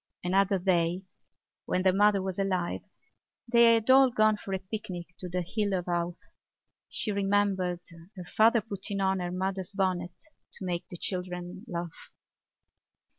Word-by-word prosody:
Another 195 +2 +2
day, 180 -1 +1 0.6
when 185 - 0
their 190 -1 +4
mother 205 0 +4
was 190 0 -4
alive, 185 -3 -1 0.7
they 235 -1 +6
had 225 -1 -1
all 265 0 +7
gone 215 -3 +3
for 205 - -8
a 190 - 0
picnic 185 -3 -7
to 180 - -6
the 180 0 -2
Hill 200 +2 -1
of 180 -1 -2
Howth. 175 0 -1 0.7
She 215 - -1
remembered 195 -3 +1 0.4
her 180 - -7
father 225 +5 +4
putting 200 -1 -4
on 190 0 +1
her 175 -1 -3
mother's 190 0 -2
bonnet 185 -3 -2 0.3
to 190 - -6
make 175 -1 -3
the 175 - -7
children 180 +2 -4
laugh. 170 -3 -6
190 Hz, 150 wpm, -29 LUFS, 180-205 Hz, 0.7 s, all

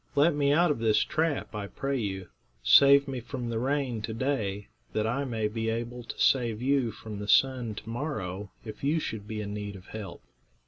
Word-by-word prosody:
Let 150 +4 +5
me 140 -1 +2
out 170 +2 +4
of 145 - -1
this 110 -2 +3
trap, 160 -6 -1
I 105 -2 -4
pray 135 +5 -2
you. 95 -4 -4 0.3
Save 140 - +7
me 135 -2 -3
from 120 0 -5
the 115 - -1
rain 130 -3 -1
to 110 +1 -4
day, 110 -6 -1 0.2
that 110 - +1
I 130 +5 0
may 110 -4 -1
be 115 +1 -2
able 120 +2 -3
to - - -8
save 120 -5 +3
you 130 -2 +2
from 110 -1 -8
the 105 - -5
sun 125 -3 +3
to 110 - -9
morrow, 110 - -4 0.2
if 110 +2 -8
you 150 +4 +2
should 105 -8 -5
be 110 -1 -4
in 105 0 -5
need 105 -1 -5
of 95 -1 -12
help." 100 -6 -7
115 Hz, 210 wpm, -28 LUFS, 105-140 Hz, 0.3 s, Save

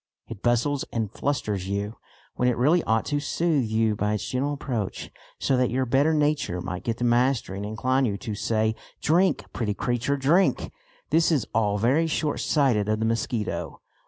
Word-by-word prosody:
It 110 -3 -9
bustles 120 +4 +1
and 110 -3 -2
flusters 105 -11 -2
you, 100 +2 -3 0.4
when 125 - 0
it 125 - -1
really 155 +8 +3
ought 110 0 +1
to 145 - 0
soothe 150 -2 0
you 110 0 +1
by 105 +1 0
its 105 - -4
gentle 135 +3 -1
approach, 125 -8 -4 0.3
so 135 - +1
that 125 -1 +2
your 130 +1 0
better 135 +5 +3
nature 150 - +1
might 90 0 -5
get 115 -1 -2
the 120 - -3
mastery 120 -4 +1
and 100 - -4
incline 130 +5 +1
you 100 -4 -1
to 105 +3 -5
say 110 +1 0 0.3
"drink, 175 +5 +2
pretty 105 -4 -2
creature, 125 +5 -1
drink." 160 +8 +2 0.4
This 165 +1 +4
is 140 -8 +1
all 105 -2 +1
very 135 +10 +2
shortsighted 140 -7 +1
of 110 - +2
the 110 - 0
mosquito. 110 - -2
120 Hz, 180 wpm, -25 LUFS, 110-140 Hz, 0.4 s, This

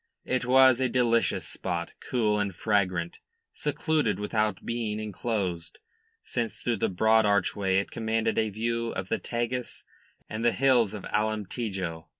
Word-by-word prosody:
It 130 -1 0
was 130 0 +6
a 130 - +2
delicious 120 -2 +2
spot, 85 -2 -3
cool 105 -4 0
and 100 -3 -2
fragrant, 90 -5 0 0.3
secluded 155 +1 0
without 105 -1 -1
being 115 -3 -2
enclosed, 100 -5 -3 0.5
since 115 -2 -3
through 120 -2 0
the - - 0
broad 110 +4 +4
archway 100 -1 +1
it 100 - -1
commanded 110 0 0
a 110 -1 +1
view 115 +2 -2
of 95 0 -4
the 115 - 0
Tagus 120 +1 -3 0.4
and 110 +1 -4
the 120 - +3
hills 120 -6 +3
of 100 - -7
Alemtejo. 105 -5 -2
110 Hz, 145 wpm, -28 LUFS, 100-120 Hz, 0.5 s, was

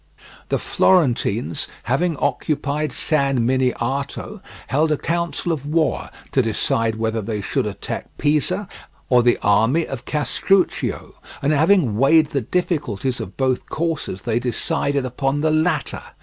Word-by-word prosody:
The - - +2
Florentines, 130 - +1 0.2
having 155 +5 0
occupied 145 +2 -1
San 140 -6 +1
Miniato, 130 +2 -1 0.2
held 155 +5 +1
a 150 - +2
council 170 0 -2
of 155 -5 -2
war 155 0 0 0.2
to 135 - +3
decide 115 0 0
whether 110 0 -1
they 105 0 -3
should 100 - -1
attack - - -5
Pisa 165 +7 0 0.4
or 125 -1 +5
the 120 0 +3
army 115 +11 +3
of 125 -3 -7
Castruccio, 180 +5 0 0.3
and, 145 +2 +3
having 155 - +3
weighed 155 +3 +5
the 140 - 0
difficulties 135 - -1
of 90 - -7
both 130 -2 0
courses, 155 - -3
they 120 -1 0
decided 135 +3 -1
upon 135 +3 -1
the 155 0 +2
latter. 155 +3 0
140 Hz, 135 wpm, -21 LUFS, 120-155 Hz, 0.4 s, or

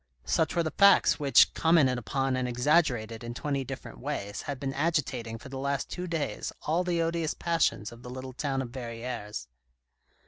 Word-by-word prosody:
Such 160 -2 +1
were 170 - +2
the 160 - -2
facts 200 +1 +5
which, 140 -2 +5
commented 150 -7 +3
upon 135 +3 -1
and 130 -1 -1
exaggerated 125 -4 +1
in 120 0 -6
twenty 140 0 -1
different 130 - -8
ways, 100 +10 -4
had 140 -2 -5
been 135 0 -3
agitating 135 -7 -1
for 130 +4 -11
the 135 0 -6
last 140 -1 -2
two 180 0 -4
days 165 -4 -2
all 165 +4 +1
the 170 -2 +1
odious 165 -1 -1
passions 165 -10 0
of 120 0 -12
the 125 - -9
little 130 +1 -7
town 135 0 -1
of 120 - -8
Verrieres. 115 - -5
135 Hz, 180 wpm, -29 LUFS, 120-155 Hz, -, facts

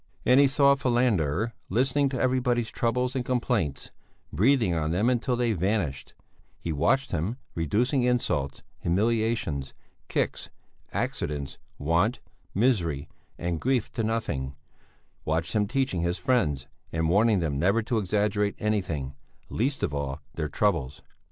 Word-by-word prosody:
And 125 +2 +6
he 140 - +7
saw 140 +1 +5
Falander, 115 - +1 0.2
listening 135 +6 +2
to 130 -2 -3
everybody's 125 -3 +1
troubles 125 +2 0
and 130 - 0
complaints, 120 - -1 0.4
breathing 110 - +3
on 80 -2 0
them 100 +9 +2
until 125 +1 0
they 120 -2 +1
vanished; 90 -7 -1 0.4
he 85 - -3
watched 135 - +2
him, 90 +8 -1 0.2
reducing 120 - +1
insults, 90 - 0 0.2
humiliations, 105 -7 0 0.3
kicks, - - -2 0.4
accidents, 70 -2 -3 0.2
want, 85 - +1 0.4
misery, 85 - +1 0.3
and 85 -2 -2
grief 130 -3 0
to - - -1
nothing; 75 -12 -2 0.7
watched 80 +2 -1
him 105 -1 +2
teaching 130 -7 0
his 85 +1 0
friends 85 - +1 0.3
and 80 0 0
warning 105 +5 +4
them 75 -6 -1
never 100 +7 +2
to 115 0 0
exaggerate 105 +1 0
anything, 85 -11 -1 0.4
least 135 +5 -1
of 70 - 0
all 70 0 -3
their 75 -2 -3
troubles. 70 -6 0
105 Hz, 130 wpm, -27 LUFS, 80-125 Hz, 0.7 s, he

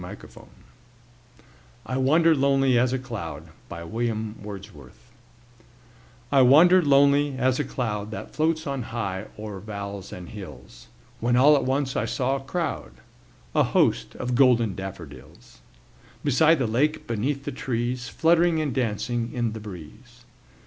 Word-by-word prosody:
William 95 +4 -8
Wordsworth - - -17 1.1
I 130 - -3
Wandered 160 +5 +4
Lonely 135 -1 +3
As 125 +1 +3
a 130 - 0
Cloud 85 - -7 2.8
I 140 -1 +5
WANDERED 160 +7 +6
lonely 140 0 +4
as 130 0 +1
a - - +1
cloud 105 -6 -3
That 110 - -8
floats 160 +1 0
on 140 -2 -3
high 105 -5 -4
o'er 105 -2 -7
vales 100 -1 -7
and 90 -1 -9
hills, 95 - -11 0.3
When 120 +1 +1
all 145 +4 +6
at 135 -3 0
once 135 +1 -1
I - - 0
saw 135 +1 -1
a 135 - -10
crowd, 170 +4 -4 0.6
A 150 - +3
host, 140 - +1
of 125 0 -3
golden 120 -5 +4
daffodils; 95 +1 -10 0.6
Beside 155 +4 +4
the 130 - 0
lake, 145 +8 0
beneath 130 +5 -2
the - - -4
trees, 125 -1 -3
Fluttering 170 +2 +3
and 150 -4 -1
dancing 115 0 -2
in 120 -3 -2
the 110 - -6
breeze. 110 +6 -12
125 Hz, 135 wpm, -25 LUFS, 110-140 Hz, 2.8 s, WANDERED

